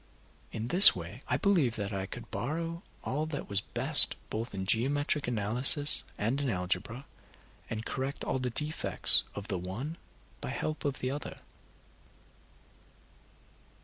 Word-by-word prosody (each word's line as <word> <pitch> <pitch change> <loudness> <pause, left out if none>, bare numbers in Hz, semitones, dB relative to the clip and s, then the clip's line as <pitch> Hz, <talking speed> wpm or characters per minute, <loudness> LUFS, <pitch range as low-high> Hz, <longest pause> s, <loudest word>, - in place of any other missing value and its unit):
In 115 +2 -6
this 185 +7 +11
way 90 +7 -9
I - - -1
believed 160 - 0
that 100 -1 -5
I 95 0 -4
could 115 +1 -10
borrow 165 +10 -5 0.2
all 150 +4 -3
that 145 -3 -7
was 100 0 -1
best - - +5 0.2
both 110 0 -5
in 95 -1 -5
geometrical 140 +5 0
analysis 125 +7 +1 0.2
and 120 +7 -2
in 140 - -2
algebra, 100 +6 -4 0.6
and 110 +1 -6
correct 135 +1 -5
all 130 - -3
the 125 -1 -3
defects 150 +6 +2
of 100 - -8
the 95 -4 -4
one 115 - -7 0.4
by - - -6
help 155 0 -5
of 140 -2 -3
the 130 - -3
other. 145 +2 -7
125 Hz, 145 wpm, -29 LUFS, 105-145 Hz, 0.6 s, this